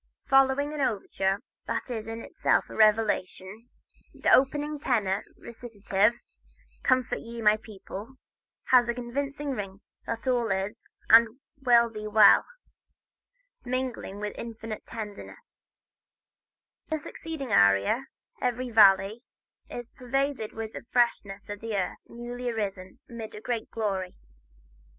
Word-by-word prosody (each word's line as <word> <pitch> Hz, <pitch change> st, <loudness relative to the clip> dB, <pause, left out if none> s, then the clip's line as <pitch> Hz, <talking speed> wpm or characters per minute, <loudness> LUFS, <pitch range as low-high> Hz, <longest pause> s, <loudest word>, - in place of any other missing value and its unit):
Following 270 Hz, +2 st, +3 dB
an 300 Hz, -, -3 dB
overture 195 Hz, -3 st, -1 dB, 0.2 s
that -, -, -3 dB
is 225 Hz, -2 st, -4 dB
in 225 Hz, 0 st, -6 dB
itself -, -, +1 dB
a -, -, -8 dB
revelation, 215 Hz, 0 st, +1 dB, 0.5 s
the -, -, +2 dB
opening 290 Hz, +3 st, +3 dB
tenor 205 Hz, -8 st, 0 dB
recitative, 220 Hz, -2 st, 0 dB, 0.7 s
"Comfort 255 Hz, -1 st, +1 dB
Ye, 235 Hz, 0 st, -8 dB
My 215 Hz, -1 st, +4 dB
People," 215 Hz, +2 st, -10 dB, 0.6 s
has 245 Hz, -2 st, +6 dB
a 235 Hz, -, 0 dB
convincing 280 Hz, +4 st, -3 dB
ring 200 Hz, -5 st, -5 dB, 0.3 s
that 230 Hz, +3 st, -4 dB
all 240 Hz, -3 st, +1 dB
is 195 Hz, +4 st, -2 dB, 0.3 s
and 230 Hz, +2 st, +7 dB, 0.2 s
will 235 Hz, -3 st, +5 dB
be 215 Hz, -1 st, -6 dB
well, 210 Hz, -1 st, +6 dB, 1.2 s
mingled 255 Hz, -5 st, -3 dB
with 210 Hz, 0 st, -4 dB
infinite 225 Hz, -1 st, -7 dB
tenderness, 220 Hz, -, -9 dB, 1.2 s
and -, -, -2 dB
the -, -, -9 dB
succeeding 300 Hz, -7 st, -6 dB
aria, 100 Hz, -, +4 dB, 0.3 s
"Every 250 Hz, 0 st, -1 dB
Valley," 200 Hz, 0 st, +5 dB, 0.5 s
is 240 Hz, -1 st, -7 dB
pervaded 270 Hz, -2 st, -2 dB
with 225 Hz, -1 st, -6 dB
the -, -, -7 dB
freshness 205 Hz, -5 st, 0 dB
of 205 Hz, +1 st, -7 dB
earth 200 Hz, -5 st, -3 dB
newly 240 Hz, +1 st, -5 dB
arisen 195 Hz, -5 st, -4 dB
amid 230 Hz, -2 st, -8 dB
great 235 Hz, -3 st, -3 dB
glory. 195 Hz, -5 st, -3 dB
230 Hz, 120 wpm, -27 LUFS, 205-250 Hz, 1.2 s, and